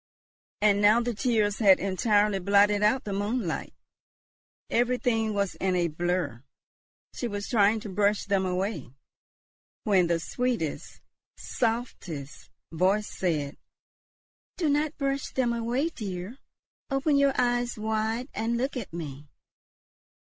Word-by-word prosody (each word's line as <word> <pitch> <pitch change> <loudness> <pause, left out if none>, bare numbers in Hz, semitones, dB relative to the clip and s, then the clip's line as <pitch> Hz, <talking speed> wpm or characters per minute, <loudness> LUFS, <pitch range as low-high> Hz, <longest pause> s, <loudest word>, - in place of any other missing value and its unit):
And 205 -1 +4
now 210 +3 +6
the 240 0 -1
tears 215 -3 +1
had 195 -4 +6
entirely 205 +1 +2
blotted 200 +2 +4
out 215 +5 +3
the 205 - -4
moonlight; 205 -2 -2 1.0
everything 240 -2 +1
was 200 -2 -1
in 190 -1 -1
a 175 -1 +1
blur. 175 -6 -2 0.7
She 245 - -3
was 205 -2 -4
trying 215 -1 +3
to 215 - -7
brush 205 +2 +1
them 200 -1 +1
away, 180 - -3 0.9
when 190 -4 +3
the 170 0 +1
sweetest, 235 - -3 0.4
softest 225 - -4 0.2
voice 190 +6 +1
said, 155 -6 -1 1.0
"Do 330 -5 +1
not 295 +1 0
brush 275 -1 -1
them 245 -2 +1
away, 240 +7 -1
dear; 205 - -6 0.5
open 275 +2 +1
your 280 -1 +4
eyes 245 -1 +1
wide 220 +3 -1
and 225 +2 -1
look 265 +4 -2
at 245 -6 -5
me." 150 -4 -7
210 Hz, 125 wpm, -27 LUFS, 185-240 Hz, 1.0 s, now